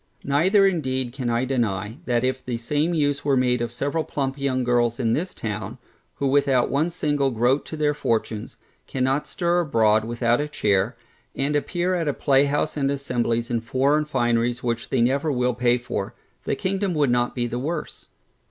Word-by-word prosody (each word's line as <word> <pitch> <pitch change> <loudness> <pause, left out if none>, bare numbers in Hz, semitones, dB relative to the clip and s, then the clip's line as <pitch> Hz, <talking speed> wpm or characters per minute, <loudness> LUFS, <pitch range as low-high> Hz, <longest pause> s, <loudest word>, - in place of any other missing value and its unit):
Neither 185 +9 +3
indeed 130 -9 0
can 130 -3 -3
I 120 +2 +1
deny, 110 -2 -2
that 120 -1 +1
if 130 0 -1
the 120 -2 -3
same 150 +8 0
use 145 -2 0
were 140 -2 +2
made 125 -1 +2
of 120 -1 -2
several 145 +6 -1
plump 135 -3 -2
young 130 -2 0
girls 120 -1 +1
in 115 -3 +1
this 180 +7 -1
town, 105 +1 -5 0.4
who 140 - -3
without 135 -2 +2
one 150 +5 +1
single 145 -5 0
groat 125 +3 +1
to 160 - -6
their 150 -1 +2
fortunes, 115 -6 -2 0.3
cannot 135 +2 0
stir 175 0 0
abroad 110 -9 +3
without 120 +2 +1
a 150 - -2
chair, 105 -3 0 0.4
and 140 +2 0
appear 175 +5 0
at 170 -3 -1
a 145 - +1
playhouse 140 +2 +2
and 140 -2 0
assemblies 120 -4 -1
in 115 -1 0
foreign 140 +6 +1
fineries 120 -3 0
which 120 -1 -2
they 130 - +1
never 140 +5 +2
will 125 -1 +1
pay 120 0 +2
for, 120 -5 -4 0.3
the - - 0
kingdom 190 -1 -1
would 145 -4 +2
not 120 0 +1
be 120 -2 0
the 120 +1 -3
worse. 155 +4 -5
130 Hz, 185 wpm, -24 LUFS, 120-145 Hz, 0.4 s, Neither